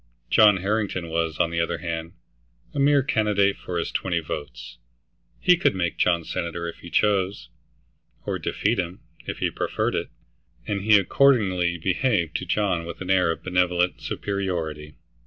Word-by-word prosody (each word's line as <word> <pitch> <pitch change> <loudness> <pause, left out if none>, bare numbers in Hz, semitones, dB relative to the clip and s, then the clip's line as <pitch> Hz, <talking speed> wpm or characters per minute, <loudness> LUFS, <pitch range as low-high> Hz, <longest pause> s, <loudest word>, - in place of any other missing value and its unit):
John 105 -3 +6
Harrington 95 -3 -1
was, 80 -1 -1
on 85 - +1
the 85 - -1
other 85 0 0
hand, 85 0 -5 0.6
a 145 - -3
mere 140 0 +4
candidate 105 -5 +2
for 90 - -5
his 85 - -2
twenty 85 -3 -1
votes; - - -7 0.6
he 180 - +5
could 175 - +1
make 85 -2 -2
John 85 -2 +2
senator 85 +1 -4
if 85 - -7
he 85 - -10
chose, 100 0 +1 0.8
or - - -2
defeat 105 +1 0
him, 90 0 -4 0.3
if - - -4
he - - -1
preferred - - -1
it, - - -2 0.6
and 100 -2 -2
he 105 +1 +6
accordingly 95 -6 +3
behaved 90 - 0
to 90 - -7
John 95 -3 0
with 85 - -8
an 95 0 -2
air 90 -3 +3
of 80 - -3
benevolent 90 -1 +1
superiority. 85 -7 -3
90 Hz, 160 wpm, -24 LUFS, 85-105 Hz, 0.8 s, John